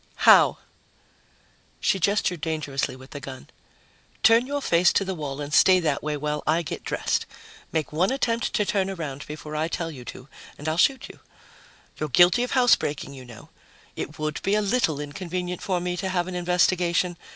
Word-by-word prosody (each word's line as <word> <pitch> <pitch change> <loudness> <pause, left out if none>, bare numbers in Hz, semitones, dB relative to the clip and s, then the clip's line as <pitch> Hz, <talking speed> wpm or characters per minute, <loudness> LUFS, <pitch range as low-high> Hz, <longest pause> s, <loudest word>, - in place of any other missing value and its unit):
"How?" - - +7 1.2
She 195 - +1
gestured 180 -3 +1
dangerously 145 -5 -2
with 130 +1 -14
the 145 - -6
gun. 135 -1 -10 0.7
"Turn 230 +3 +5
your 285 +1 -2
face 170 +1 +4
to 200 - +1
the 190 - -2
wall 145 -5 -5
and 145 0 -5
stay 185 +3 +6
that 150 -5 -1
way 150 0 -2
while 150 +1 -2
I 165 +2 +2
get - - -6
dressed. - - -1 0.4
Make 155 -3 -2
one 175 +5 +2
attempt 235 -3 0
to 210 - +1
turn 195 -1 0
around 150 -7 -6
before 150 0 -7
I 155 +1 0
tell 165 -1 -3
you 130 -5 -10
to 125 - -9 0.3
and 150 - -8
I'll 155 - 0
shoot 265 +10 +2
you. - - -14 0.8
You're 155 - -2
guilty 175 - +5
of 250 - -2
housebreaking, 230 - +2
you 130 -2 -11
know. 120 -2 -13 0.5
It 150 - -6
would 155 -1 -3
be 195 +2 +1
a 215 - +2
little 200 - +1
inconvenient 180 +4 -5
for 185 -2 -1
me 180 0 -2
to 190 +2 -2
have 180 -1 -1
an 185 - -5
investigation 180 0 +1
170 Hz, 185 wpm, -25 LUFS, 150-185 Hz, 1.2 s, How